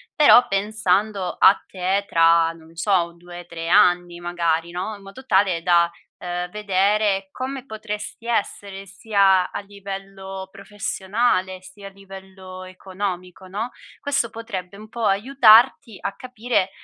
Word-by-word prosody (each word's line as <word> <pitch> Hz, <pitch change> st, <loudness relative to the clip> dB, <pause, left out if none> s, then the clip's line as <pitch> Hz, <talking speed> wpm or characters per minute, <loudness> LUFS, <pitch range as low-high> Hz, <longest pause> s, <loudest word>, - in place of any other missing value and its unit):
però 290 Hz, -4 st, +7 dB
pensando 200 Hz, -1 st, 0 dB
a 195 Hz, -, +5 dB
te 190 Hz, +2 st, -1 dB
tra, 165 Hz, 0 st, +4 dB
non 165 Hz, 0 st, -17 dB
so, 170 Hz, -1 st, +1 dB
2-3 175 Hz, -1 st, -9 dB
anni 175 Hz, -2 st, +3 dB
magari, 170 Hz, -1 st, -1 dB
no, 190 Hz, +5 st, -4 dB
in 200 Hz, -, -15 dB
modo 200 Hz, +7 st, -12 dB
tale 190 Hz, -5 st, +2 dB
da, 170 Hz, -1 st, +3 dB, 0.3 s
uhm, 180 Hz, 0 st, -4 dB
vedere 200 Hz, -1 st, +1 dB
come 265 Hz, 0 st, -6 dB
potresti 215 Hz, -1 st, -7 dB
essere 200 Hz, -3 st, -3 dB
sia 195 Hz, -1 st, +2 dB
a -, -, -4 dB
livello 195 Hz, -1 st, -8 dB
professionale, 195 Hz, -1 st, -2 dB
sia 195 Hz, +2 st, -12 dB
a -, -, -8 dB
livello 190 Hz, -1 st, -12 dB
economico, 185 Hz, 0 st, -6 dB
no, 215 Hz, +6 st, -4 dB, 0.3 s
questo 275 Hz, -5 st, -1 dB
potrebbe 200 Hz, -5 st, -7 dB
un 215 Hz, +1 st, -12 dB
po' 230 Hz, 0 st, -4 dB
aiutarti 230 Hz, +1 st, +4 dB
a 200 Hz, -, -4 dB
capire 245 Hz, -5 st, -2 dB
195 Hz, 130 wpm, -22 LUFS, 180-210 Hz, 0.3 s, però